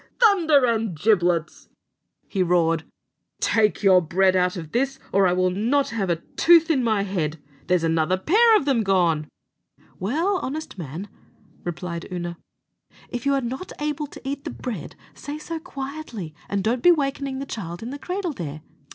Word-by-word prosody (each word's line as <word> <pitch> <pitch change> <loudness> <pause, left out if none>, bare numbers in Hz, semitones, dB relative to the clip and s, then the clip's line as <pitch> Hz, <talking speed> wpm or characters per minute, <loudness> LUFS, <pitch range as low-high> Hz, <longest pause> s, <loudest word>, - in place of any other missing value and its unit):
"Thunder 335 - +5
and 220 -8 -1
giblets!" 175 -5 +1 0.6
he 195 - -1
roared, 165 -2 +2 0.5
"take 215 -2 +2
your 190 -2 +6
bread 185 +3 +2
out 180 +1 +2
of 160 -3 -7
this, 270 +2 0 0.2
or 195 -1 +5
I 180 - +2
will 185 0 +2
not 240 +9 +1
have 205 -5 -2
a 170 - +3
tooth 330 - +4
in 265 -5 +2
my 215 -4 +2
head; 165 -6 -2 0.3
there's 180 -2 +2
another 165 +2 +2
pair 435 - +5
of 275 - -2
them 265 -5 +2
gone!" 175 -7 +2 0.7
"Well, 325 - 0
honest 310 0 -5
man," 165 +5 -6 0.6
replied 175 0 -5
Oonagh, 175 -1 -4 0.7
"if 245 +2 -4
you're 275 -1 +2
not 260 +10 -5
able 295 0 -2
to 270 - -11
eat 280 0 -3
the 315 - -4
bread, 245 -6 -6 0.2
say 290 +1 -7
so 325 +2 -5
quietly, 270 - -7 0.2
and 200 -1 -1
don't 235 +3 0
be 355 - +7
wakening 275 -3 -1
the 275 - -4
child 180 -7 -6
in 240 - -5
the 285 - -6
cradle 360 -1 -3
there. 155 - -6
220 Hz, 170 wpm, -24 LUFS, 180-280 Hz, 0.7 s, be